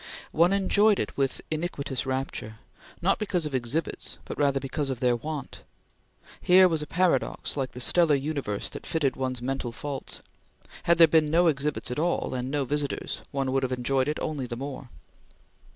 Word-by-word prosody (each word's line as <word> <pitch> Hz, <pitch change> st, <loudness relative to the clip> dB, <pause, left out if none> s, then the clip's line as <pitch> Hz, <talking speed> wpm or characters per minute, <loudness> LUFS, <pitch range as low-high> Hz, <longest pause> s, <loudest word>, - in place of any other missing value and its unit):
One 170 Hz, +3 st, +4 dB
enjoyed 200 Hz, +1 st, +4 dB
it -, -, -3 dB
with 135 Hz, -1 st, -1 dB
iniquitous 145 Hz, -5 st, -2 dB
rapture, 130 Hz, -4 st, -3 dB, 0.5 s
not -, -, +3 dB
because 180 Hz, -6 st, -1 dB
of 150 Hz, -, -4 dB
exhibits 130 Hz, +6 st, -2 dB
but -, -, -5 dB
rather 140 Hz, -2 st, +2 dB
because 135 Hz, +2 st, -3 dB
of 130 Hz, -3 st, -3 dB
their 125 Hz, -1 st, +3 dB
want. 150 Hz, +2 st, -6 dB, 0.8 s
Here 185 Hz, +1 st, +7 dB
was 160 Hz, -3 st, -1 dB
a 150 Hz, -, -5 dB
paradox 170 Hz, -7 st, +1 dB
like 135 Hz, -3 st, -2 dB
the 125 Hz, -, -7 dB
stellar 160 Hz, +4 st, +4 dB
universe 140 Hz, -8 st, -2 dB
that -, -, -8 dB
fitted 145 Hz, -5 st, +1 dB
one's 130 Hz, -2 st, -3 dB
mental 135 Hz, -2 st, -2 dB
faults. 140 Hz, +3 st, -6 dB, 0.6 s
Had 170 Hz, 0 st, +4 dB
there 165 Hz, -1 st, +9 dB
been 160 Hz, -2 st, +3 dB
no 170 Hz, +3 st, +4 dB
exhibits 145 Hz, -4 st, 0 dB
at 125 Hz, -, -2 dB
all, 170 Hz, -3 st, 0 dB
and 125 Hz, 0 st, -2 dB
no 140 Hz, -1 st, 0 dB
visitors, 145 Hz, +1 st, -3 dB
one 135 Hz, -2 st, -1 dB
would 135 Hz, 0 st, +2 dB
have 130 Hz, -1 st, -1 dB
enjoyed 130 Hz, +2 st, +1 dB
it 150 Hz, -, -1 dB
only 145 Hz, -5 st, -2 dB
the 120 Hz, -1 st, -5 dB
more. 135 Hz, -1 st, -6 dB
140 Hz, 180 wpm, -27 LUFS, 130-160 Hz, 0.8 s, there